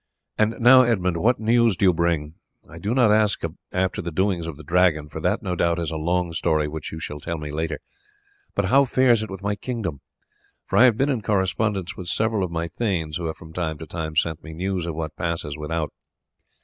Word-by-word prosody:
And 110 Hz, +1 st, +2 dB
now, 125 Hz, +2 st, +8 dB
Edmund, 95 Hz, -8 st, +1 dB
what 115 Hz, +8 st, +2 dB
news 115 Hz, -2 st, +3 dB
do 100 Hz, -, +2 dB
you 90 Hz, -, +5 dB
bring? 80 Hz, -3 st, 0 dB, 0.3 s
I 85 Hz, -, -11 dB
do 105 Hz, +7 st, -1 dB
not 120 Hz, -5 st, +5 dB
ask 105 Hz, -1 st, +2 dB, 0.3 s
after 90 Hz, 0 st, 0 dB
the 85 Hz, -, -4 dB
doings 90 Hz, -1 st, 0 dB
of 80 Hz, -4 st, -6 dB
the 80 Hz, -, -11 dB
Dragon, 85 Hz, -2 st, +2 dB
for -, -, -6 dB
that -, -, 0 dB
no 90 Hz, -, -2 dB
doubt 85 Hz, 0 st, +1 dB
is 85 Hz, -1 st, -2 dB
a -, -, -4 dB
long 85 Hz, +2 st, 0 dB
story 80 Hz, -2 st, +1 dB
which 75 Hz, 0 st, -6 dB
you 80 Hz, -, -6 dB
shall 75 Hz, -2 st, -6 dB
tell 85 Hz, +3 st, -4 dB
me 75 Hz, -1 st, -6 dB
later, 80 Hz, +2 st, -2 dB, 0.8 s
but -, -, +1 dB
how 135 Hz, +8 st, +5 dB
fares 125 Hz, -3 st, +3 dB
it 110 Hz, -, -5 dB
with 95 Hz, 0 st, -8 dB
my 105 Hz, 0 st, 0 dB
kingdom? 100 Hz, -, -4 dB, 0.7 s
I 130 Hz, -, +6 dB
have 120 Hz, -4 st, +4 dB
been 135 Hz, +3 st, +2 dB
in 130 Hz, -5 st, 0 dB
correspondence 100 Hz, -1 st, 0 dB
with 90 Hz, -, -8 dB
several 110 Hz, +1 st, +1 dB
of 90 Hz, -, -2 dB
my 85 Hz, 0 st, -2 dB
thanes, 85 Hz, -5 st, -2 dB
who 85 Hz, -1 st, -3 dB
have 80 Hz, -, -4 dB
from 80 Hz, 0 st, -13 dB
time 80 Hz, -3 st, -2 dB
to 80 Hz, -, -8 dB
time 80 Hz, 0 st, -5 dB
sent 80 Hz, 0 st, 0 dB
me 80 Hz, -, -9 dB
news 90 Hz, +1 st, -2 dB
of 85 Hz, -, -3 dB
what 80 Hz, -1 st, -4 dB
passes 85 Hz, -4 st, -2 dB
without. 75 Hz, 0 st, -3 dB
90 Hz, 225 wpm, -23 LUFS, 80-105 Hz, 0.8 s, now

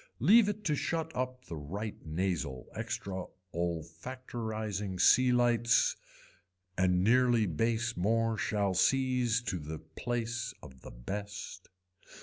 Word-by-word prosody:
Leave 205 Hz, -, +6 dB
it 210 Hz, +1 st, -4 dB
to 160 Hz, -7 st, +1 dB
shut 160 Hz, +2 st, -1 dB
up 130 Hz, 0 st, -3 dB
the 85 Hz, -, -6 dB
right 100 Hz, +9 st, -6 dB
nasal 80 Hz, -6 st, -2 dB
extra 105 Hz, -4 st, -4 dB, 0.3 s
ollofactorising 100 Hz, +4 st, -4 dB
sea 125 Hz, +6 st, +6 dB
lights 120 Hz, -1 st, +3 dB, 0.8 s
and 90 Hz, 0 st, +2 dB
nearly 120 Hz, 0 st, +4 dB
base 115 Hz, +6 st, 0 dB
more 115 Hz, +5 st, +1 dB
shall 100 Hz, -2 st, 0 dB
sees 125 Hz, +2 st, +2 dB
to 95 Hz, -6 st, -2 dB
the 80 Hz, +1 st, -6 dB
place 120 Hz, +9 st, -4 dB
of 65 Hz, -4 st, -12 dB
the -, -, -9 dB
best. 100 Hz, +12 st, -7 dB
110 Hz, 120 wpm, -31 LUFS, 90-120 Hz, 0.8 s, Leave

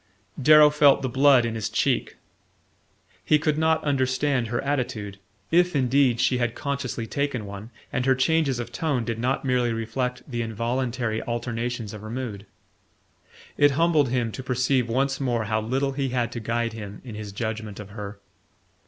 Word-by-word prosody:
Darrow 150 Hz, +2 st, +7 dB
felt 145 Hz, -2 st, +4 dB
the 130 Hz, -, 0 dB
blood 135 Hz, -1 st, +5 dB
in 115 Hz, -, -2 dB
his 110 Hz, -2 st, -3 dB
cheek. -, -, 0 dB, 1.1 s
He 155 Hz, -, +4 dB
could 150 Hz, 0 st, 0 dB
not 160 Hz, 0 st, +2 dB
understand 130 Hz, -2 st, +1 dB
her 120 Hz, +1 st, -2 dB
attitude 115 Hz, -8 st, -3 dB, 0.3 s
if 175 Hz, 0 st, +3 dB
indeed 130 Hz, -2 st, +3 dB
she 125 Hz, 0 st, +2 dB
had 120 Hz, -1 st, -1 dB
consciously 140 Hz, -5 st, -3 dB
taken 140 Hz, -2 st, -2 dB
one, 100 Hz, +2 st, -8 dB, 0.2 s
and 125 Hz, +1 st, 0 dB
her 130 Hz, -, +5 dB
changes 145 Hz, -1 st, +2 dB
of 120 Hz, 0 st, -5 dB
tone 135 Hz, -5 st, -1 dB
did 115 Hz, -1 st, -3 dB
not 130 Hz, +3 st, -1 dB
merely 125 Hz, -2 st, +1 dB
reflect 125 Hz, +2 st, -3 dB
the 120 Hz, -4 st, -3 dB
involuntary 115 Hz, 0 st, -2 dB
alternations 120 Hz, -1 st, -3 dB
of 105 Hz, -, -8 dB
her 110 Hz, -, -8 dB
mood. 110 Hz, -5 st, -5 dB, 1.1 s
It 145 Hz, 0 st, +5 dB
humbled 160 Hz, -5 st, +3 dB
him 120 Hz, -2 st, 0 dB
to 130 Hz, -, -6 dB
perceive 125 Hz, -1 st, 0 dB
once 135 Hz, +3 st, 0 dB
more 120 Hz, -4 st, 0 dB
how 110 Hz, +1 st, 0 dB
little 135 Hz, +5 st, -1 dB
he 135 Hz, -1 st, -2 dB
had 120 Hz, -2 st, -1 dB
to 120 Hz, -, -5 dB
guide 115 Hz, +1 st, -1 dB
him 105 Hz, -2 st, -8 dB
in 120 Hz, -, -8 dB
his 105 Hz, -1 st, -7 dB
judgment 110 Hz, -1 st, -4 dB
of 105 Hz, -1 st, -9 dB
her. 105 Hz, -1 st, -7 dB
125 Hz, 170 wpm, -25 LUFS, 115-135 Hz, 1.1 s, Darrow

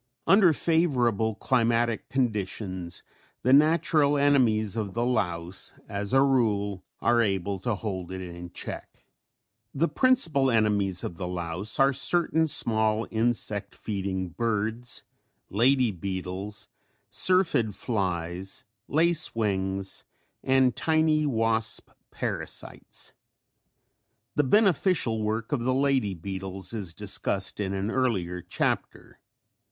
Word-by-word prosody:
Under 195 Hz, -3 st, +6 dB
favorable 125 Hz, -, +1 dB
climatic 115 Hz, -1 st, +1 dB
conditions 100 Hz, -7 st, -2 dB, 0.4 s
the 130 Hz, -, +4 dB
natural 150 Hz, -1 st, +4 dB
enemies 120 Hz, -7 st, +3 dB
of 105 Hz, -3 st, -3 dB
the 120 Hz, +1 st, 0 dB
louse 90 Hz, -7 st, -2 dB
as 100 Hz, 0 st, -3 dB
a 135 Hz, +1 st, +5 dB
rule 105 Hz, -8 st, +1 dB, 0.2 s
are 120 Hz, 0 st, +3 dB
able 100 Hz, -2 st, -1 dB
to 115 Hz, +3 st, -1 dB
hold 95 Hz, -3 st, -5 dB
it 95 Hz, -, -5 dB
in 90 Hz, -1 st, -8 dB
check. -, -, -8 dB, 0.7 s
The 160 Hz, +5 st, +2 dB
principal 165 Hz, -, +3 dB
enemies 105 Hz, -5 st, +1 dB
of 85 Hz, -, -5 dB
the 90 Hz, -, -4 dB
louse 90 Hz, +3 st, -3 dB
are 135 Hz, 0 st, +5 dB
certain 160 Hz, +3 st, +2 dB
small 110 Hz, -6 st, +2 dB
insect 110 Hz, -2 st, -1 dB
feeding 95 Hz, -3 st, -3 dB
birds, 115 Hz, +4 st, -1 dB, 0.5 s
lady 125 Hz, +3 st, +3 dB
beetles, 95 Hz, +2 st, -4 dB, 0.4 s
syrphid 165 Hz, -, +2 dB
flies, 95 Hz, -1 st, -3 dB, 0.2 s
lace 165 Hz, -1 st, +2 dB
wings 95 Hz, -3 st, -2 dB, 0.4 s
and 130 Hz, -1 st, +3 dB
tiny 155 Hz, -1 st, +2 dB
wasp 115 Hz, -3 st, -1 dB, 0.2 s
parasites. -, -, -5 dB, 1.2 s
The 150 Hz, -, +2 dB
beneficial 180 Hz, -, +3 dB
work 110 Hz, +1 st, -2 dB
of 135 Hz, -5 st, 0 dB
the 130 Hz, +1 st, +1 dB
lady 135 Hz, -8 st, +1 dB
beetles 95 Hz, +2 st, -4 dB
is 95 Hz, -7 st, -5 dB
discussed -, -, -1 dB
in 100 Hz, -1 st, -2 dB
an 100 Hz, +3 st, -2 dB
earlier 95 Hz, -10 st, -1 dB
chapter. 90 Hz, -, -3 dB
110 Hz, 110 wpm, -27 LUFS, 95-135 Hz, 1.2 s, Under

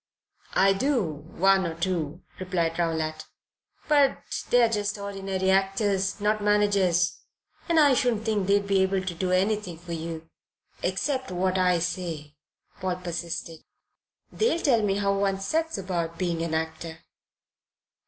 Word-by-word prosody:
"I 195 Hz, +1 st, +5 dB
do 255 Hz, +3 st, +1 dB
one 180 Hz, +6 st, +1 dB
or 165 Hz, -, -5 dB
two," 170 Hz, -3 st, -2 dB, 0.2 s
replied 175 Hz, -3 st, -1 dB
Rowlatt; 160 Hz, -2 st, -1 dB, 0.6 s
"but 290 Hz, -3 st, +4 dB, 0.3 s
they're 245 Hz, -1 st, +5 dB
just 210 Hz, -2 st, -1 dB
ordinary 195 Hz, -1 st, -2 dB
actors 195 Hz, 0 st, +1 dB
not 210 Hz, 0 st, 0 dB
managers; 200 Hz, -4 st, +2 dB, 0.5 s
and 335 Hz, -1 st, +4 dB
I 290 Hz, -3 st, +6 dB
shouldn't 245 Hz, -4 st, +1 dB
think 210 Hz, -4 st, 0 dB
they'd 200 Hz, 0 st, +3 dB
be 195 Hz, -1 st, +2 dB
able 190 Hz, 0 st, +1 dB
to 185 Hz, -2 st, -3 dB
do 180 Hz, +2 st, -2 dB
anything 190 Hz, -1 st, 0 dB
for 170 Hz, 0 st, -8 dB
you." 165 Hz, 0 st, -5 dB, 0.5 s
"Except 260 Hz, +8 st, -1 dB
what 185 Hz, +1 st, 0 dB
I 180 Hz, -1 st, +3 dB
say," 165 Hz, -4 st, -4 dB, 0.5 s
Paul 185 Hz, -2 st, -1 dB
persisted. 170 Hz, -2 st, -5 dB, 0.7 s
"They'll 435 Hz, -6 st, +1 dB
tell 240 Hz, -6 st, +4 dB
me 200 Hz, -2 st, +1 dB
how 200 Hz, 0 st, +1 dB
one 195 Hz, -1 st, 0 dB
sets 320 Hz, +9 st, -1 dB
about 170 Hz, -3 st, -3 dB
being 170 Hz, -3 st, -1 dB
an 165 Hz, -1 st, -1 dB
actor." 160 Hz, 0 st, -4 dB
190 Hz, 140 wpm, -26 LUFS, 170-205 Hz, 0.7 s, I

